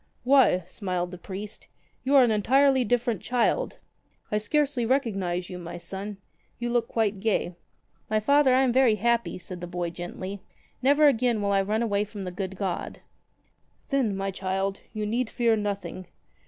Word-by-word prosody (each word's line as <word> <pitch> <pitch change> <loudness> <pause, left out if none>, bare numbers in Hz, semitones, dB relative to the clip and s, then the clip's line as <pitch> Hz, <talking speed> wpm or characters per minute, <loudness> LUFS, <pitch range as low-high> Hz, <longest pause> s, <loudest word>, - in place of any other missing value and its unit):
"Why," 255 -9 +5
smiled 180 -1 -3
the 180 - -8
priest, 200 +3 -8 0.4
''you 275 +2 +2
are 270 - +8
an 240 - +3
entirely 265 +5 +4
different 240 -3 0
child. 250 - 0 0.5
I 210 - +2
scarcely 285 +2 0
recognize 195 -9 0
you, 180 - -7
my 170 -1 -7
son. 195 +3 -6 0.4
You 240 0 -3
look 240 -1 +1
quite 215 -3 0
gay." 195 -4 0 0.6
"My 215 0 +2
Father, 280 +4 +4
I 265 - +4
am 250 -3 +2
very 255 -4 +5
happy," 235 +1 0
said 180 -1 -9
the 175 - -5
boy 175 -1 -3
gently. 185 +3 -6 0.4
"Never 285 +3 +5
again 240 -4 +2
will 200 -1 0
I 195 0 +3
run 215 +4 0
away 205 -3 +1
from 210 -1 -7
the 180 - -4
good 190 +1 -4
God." 190 -2 -4 0.9
"Then, 255 -9 +1
my 195 0 -2
child, 195 +1 -2
you 215 -1 -3
need 235 +2 -1
fear 235 -2 +2
nothing. 195 -4 -4
210 Hz, 170 wpm, -26 LUFS, 190-245 Hz, 0.9 s, are